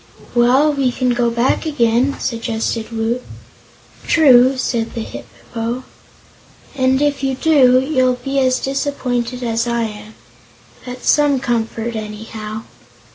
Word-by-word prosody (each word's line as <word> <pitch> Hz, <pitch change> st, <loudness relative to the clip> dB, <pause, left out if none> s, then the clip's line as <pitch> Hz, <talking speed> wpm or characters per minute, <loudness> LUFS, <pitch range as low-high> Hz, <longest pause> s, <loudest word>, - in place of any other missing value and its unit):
"Well, 255 Hz, +5 st, +4 dB
we 270 Hz, -3 st, +1 dB
can 250 Hz, +1 st, -1 dB
go 240 Hz, -1 st, +1 dB
back 235 Hz, +7 st, 0 dB
again," 255 Hz, -1 st, +1 dB
suggested 230 Hz, -1 st, -3 dB
Woot. 230 Hz, +2 st, -1 dB, 0.9 s
"True," 265 Hz, -4 st, +5 dB
said 235 Hz, -3 st, -2 dB
the 230 Hz, -, -3 dB
Hip -, -, -9 dB, 0.3 s
po; 235 Hz, +2 st, -3 dB, 0.9 s
"and 260 Hz, -1 st, +2 dB
if 290 Hz, -2 st, 0 dB
you 270 Hz, -1 st, -1 dB
do, 260 Hz, -4 st, +4 dB
you'll 260 Hz, -2 st, +1 dB
be 275 Hz, 0 st, 0 dB
as 255 Hz, -1 st, +2 dB
disappointed 255 Hz, -3 st, -2 dB
as 230 Hz, 0 st, -1 dB
I 235 Hz, 0 st, 0 dB
am. 210 Hz, 0 st, -7 dB, 0.7 s
That's 250 Hz, 0 st, -7 dB
some 290 Hz, -3 st, +3 dB
comfort, 235 Hz, -1 st, -2 dB
anyhow." 215 Hz, 0 st, -6 dB
245 Hz, 130 wpm, -18 LUFS, 230-265 Hz, 0.9 s, True